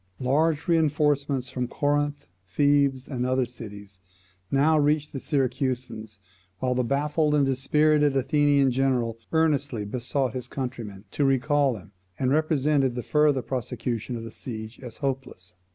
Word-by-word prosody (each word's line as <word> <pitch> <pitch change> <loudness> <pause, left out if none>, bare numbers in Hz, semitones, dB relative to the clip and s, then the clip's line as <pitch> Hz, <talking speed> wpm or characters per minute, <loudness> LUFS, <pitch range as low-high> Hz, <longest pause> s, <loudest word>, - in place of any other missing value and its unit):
Large 150 +4 +1
reinforcements 145 -5 +1
from 125 -1 -3
Corinth, 145 +2 -1 0.2
Thebes, 140 +1 +2
and 125 -4 -3
other 130 0 +1
cities, 105 -5 -11 0.5
now 150 +3 +3
reached 150 0 +1
the 135 - -3
Syracusans; 125 -6 -2 0.4
while 125 +4 0
the 125 0 +1
baffled 150 +4 +1
and 145 -2 +3
dispirited 145 +2 +2
Athenian 140 0 +3
general 125 -3 0
earnestly 145 -8 +1
besought 125 +4 -2
his 125 -2 -5
countrymen 120 -7 -6
to 145 - 0
recall 135 0 +2
him, 100 0 -14 0.3
and 130 -1 0
represented 145 -3 +2
the 125 - -3
further 150 -4 +2
prosecution 125 -1 -3
of 115 - -5
the 115 - -8
siege 110 -1 -7
as 120 -4 -10
hopeless. 130 -10 -4
135 Hz, 135 wpm, -26 LUFS, 125-145 Hz, 0.5 s, now